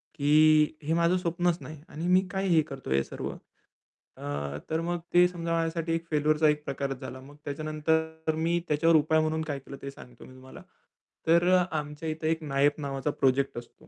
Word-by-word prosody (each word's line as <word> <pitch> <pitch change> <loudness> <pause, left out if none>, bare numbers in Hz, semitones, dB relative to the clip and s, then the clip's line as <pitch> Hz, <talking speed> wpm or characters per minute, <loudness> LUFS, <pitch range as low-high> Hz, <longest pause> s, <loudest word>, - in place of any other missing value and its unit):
की 155 +1 +4
"हे 155 +3 0
माझं 170 +2 +3
स्वप्नच 175 -1 0
नाही 155 -2 -9
आणि 165 +3 -5
मी 180 +1 +5
काय 195 0 -1
हे 165 -2 +5
करतोय 135 - -4
हे 70 - +2
सर्व?" - - -6 0.9
अ, - - -10 0.5
तर 160 - 0
मग 175 +1 -2
ते 175 0 +7
समजा 170 -2 -5
माझ्यासाठी 165 0 -1
एक 165 0 -4
फेल्युरचा 155 +1 +3
एक 150 0 0
प्रकारच 135 -1 -3
झाला. 130 0 -7
मग 145 +2 -14
त्याच्यानंतर 160 +2 -1
मी 165 +2 +1
त्याच्यावर 160 +2 +3
उपाय 155 +1 +4
म्हणून 155 0 -1
काय 140 -1 -2
केलं 135 +1 -10
ते 140 - -6
सांगतो 125 -3 -14
मी - - -14
तुम्हाला. 130 0 -13 0.7
तर 170 +2 +4
अ, 180 - +4
आमच्या 150 +1 -5
इथे 155 0 -2
एक 165 0 -1
नायब 145 +1 +1
नावाचा 135 0 -2
प्रोजेक्ट 135 -1 +1
असतो. 120 +6 -17
155 Hz, 190 wpm, -28 LUFS, 145-165 Hz, 0.9 s, ते